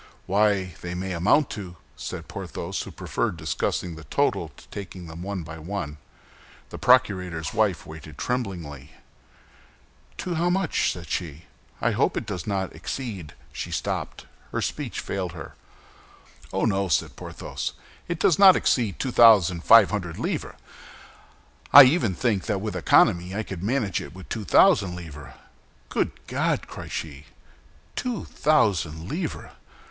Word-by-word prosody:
"Why, 100 -2 +2
they 90 0 -5
may 95 +1 -3
amount 100 - +3
to—", 95 -4 -7 0.2
said - - -6
Porthos, - - -5
who - - -7
preferred 85 - -2
discussing 80 +2 -2
the 80 - -10
total - - 0
to - - -16
taking 95 -3 -8
them 80 +1 -9
one 95 -1 -4
by 80 0 -9
one. 80 -3 -5 0.7
The - - -7
procurator's 90 -10 +2
wife 100 -7 +1
waited 80 -1 -11
tremblingly. 85 - -4 1.2
"To 180 - -3
how 170 +2 +1
much?" 185 -2 +1
said 85 -3 -8
she. 80 0 -4 0.4
"I - - +2
hope - - +1
it - - -2
does 95 -4 -5
not 95 -2 -2
exceed—" 95 - -6 0.2
She - - -5
stopped; - - -3 0.3
speech - - -3
failed 95 -3 -3
her. 85 - -9 1.0
"Oh, 95 - 0
no," 100 -3 +1
said 85 - 0
Porthos, - - -5 0.3
"it 170 -1 -3
does 170 - +3
not 195 -2 +9
exceed 110 -8 +1
two 130 - -2
thousand 100 -8 +6
five 115 0 +7
hundred 90 -6 -3
livres! - - -3 1.2
I 145 - +12
even 130 - +2
think 110 -4 0
that 105 -4 0
with 105 -1 -4
economy 90 +2 +3
I 110 - -1
could 95 -4 -7
manage 110 -2 0
it - - -10
with 95 - -11
two 110 -2 -4
thousand 90 +1 +5
livres." 75 -5 -9 0.5
"Good - - 0
God!" - - -1
cried - - -9
she, 75 -2 -6 0.7
"two 245 -4 -3
thousand 90 - +1
livres! 160 - -4
95 Hz, 145 wpm, -25 LUFS, 85-110 Hz, 1.2 s, I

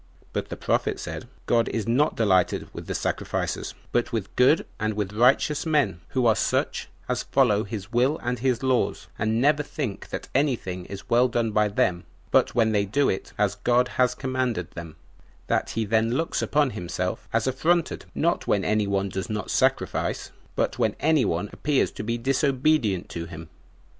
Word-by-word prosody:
But - - -3
the - - -5
prophet - - 0
said, - - -6 0.2
"God 115 -1 +2
is 115 -1 -2
not 135 +6 +2
delighted 95 -5 +2
with - - -7
sacrifices, - - -2 0.2
but 120 - 0
with 110 -4 -3
good 130 +6 +4
and 110 0 -1
with 105 -1 -2
righteous 130 +6 +3
men, 145 - +1
who 130 -2 0
are 110 -2 +5
such - - -1 0.2
as - - 0
follow 115 -6 +2
his 100 0 -6
will 130 +6 +3
and 125 0 -1
his 125 0 0
laws, 130 -2 +1
and 110 +1 +1
never 145 +3 +3
think 140 -7 -5
that - - -5
any 140 0 +3
thing 90 -4 -6
is 100 +1 -9
well 120 +2 +4
done 115 -2 0
by 105 0 +3
them 90 -3 0 0.3
but - - +3
when 115 -2 +3
they 105 -1 +2
do 135 +8 +1
it 95 - -3
as 105 -1 +2
God 120 +4 +2
had 125 -1 +1
commanded 130 - -2
them; 85 -2 -8 0.5
that - - 0
he 115 - +1
then 110 +2 +2
looks 165 +4 -1
upon 145 -2 +2
himself 90 0 -4
as 115 -1 +1
affronted, 160 +6 +1
not 170 +2 0
when 100 -2 +2
any 105 -1 +1
one 100 0 0
does 95 +3 -4
not 105 -3 -3
sacrifice, - - 0 0.2
but - - -1
when - - +1
any 155 -5 +3
one 90 +2 -1
appears 145 -2 +1
to - - -6
be 115 +2 -1
disobedient 130 - +1
to 85 -1 -5
him. 80 -1 -9
115 Hz, 185 wpm, -25 LUFS, 100-130 Hz, 0.5 s, are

